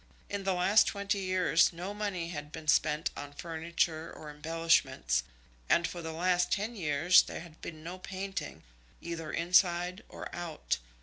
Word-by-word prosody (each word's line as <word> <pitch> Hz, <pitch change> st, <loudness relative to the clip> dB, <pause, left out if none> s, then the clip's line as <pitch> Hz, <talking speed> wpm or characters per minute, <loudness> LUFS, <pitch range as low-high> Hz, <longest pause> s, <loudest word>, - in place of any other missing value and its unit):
In 200 Hz, -1 st, -3 dB
the 190 Hz, -1 st, +2 dB
last 195 Hz, +4 st, +5 dB
twenty 200 Hz, 0 st, -1 dB
years 185 Hz, -3 st, +3 dB
no 180 Hz, +4 st, -5 dB
money 200 Hz, -5 st, -3 dB
had 150 Hz, -3 st, -6 dB
been 155 Hz, 0 st, -8 dB
spent 155 Hz, 0 st, +3 dB
on 145 Hz, 0 st, -7 dB
furniture 165 Hz, 0 st, -2 dB
or 150 Hz, -1 st, -9 dB
embellishments, 150 Hz, -, +1 dB, 0.5 s
and 170 Hz, 0 st, +4 dB
for 175 Hz, -, -6 dB
the 160 Hz, -1 st, -5 dB
last 175 Hz, +2 st, +1 dB
ten 215 Hz, +4 st, -1 dB
years 165 Hz, 0 st, +5 dB
there -, -, -6 dB
had 165 Hz, -2 st, -13 dB
been 155 Hz, -2 st, -8 dB
no 175 Hz, +3 st, -6 dB
painting, 190 Hz, -, -5 dB, 0.4 s
either 165 Hz, -2 st, -5 dB
inside 180 Hz, +2 st, +2 dB
or -, -, -8 dB
out. 170 Hz, -, -2 dB
170 Hz, 160 wpm, -31 LUFS, 160-185 Hz, 0.5 s, last